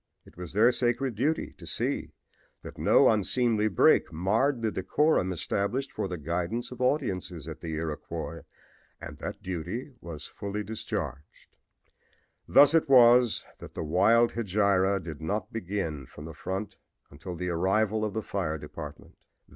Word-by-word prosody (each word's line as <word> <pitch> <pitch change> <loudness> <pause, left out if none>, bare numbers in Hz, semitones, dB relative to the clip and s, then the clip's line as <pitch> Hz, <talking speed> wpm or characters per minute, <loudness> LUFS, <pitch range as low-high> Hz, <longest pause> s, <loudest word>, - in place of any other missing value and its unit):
It - - -18
was 90 -1 -8
their 110 +5 +5
sacred 120 +1 0
duty 140 +9 -1
to - - -10
see - - -2 0.5
that - - -10
no - - +5
unseemly 110 +1 +2
break 95 - +4
marred 115 - +1
the 110 - +1
decorum 95 - +1
established 100 - -2
for - - -3
the 90 -1 -4
guidance 90 - -3
of 125 0 -8
audiences 95 - -1
at 80 -1 -8
the 80 -2 -4
Iroquois, 80 -1 -5 0.6
and - - -9
that - - -6
duty 95 - -5
was 80 -3 -8
fully 100 0 -5
discharged. 75 -10 -6 0.9
Thus 145 +1 +7
it 160 -3 +3
was 125 -2 +6
that - - -11
the - - -3
wild 115 +9 +4
hegira 100 -3 +2
did 80 -5 -8
not 100 +7 -3
begin 90 - -3
from 75 - -11
the 80 - -8
front 95 +5 -5 0.3
until 80 +5 -8
the 90 +1 -3
arrival 100 +5 +1
of 105 -2 -2
the 110 - -2
fire 85 -7 -2
department. 75 0 -9
100 Hz, 150 wpm, -28 LUFS, 85-115 Hz, 0.9 s, Thus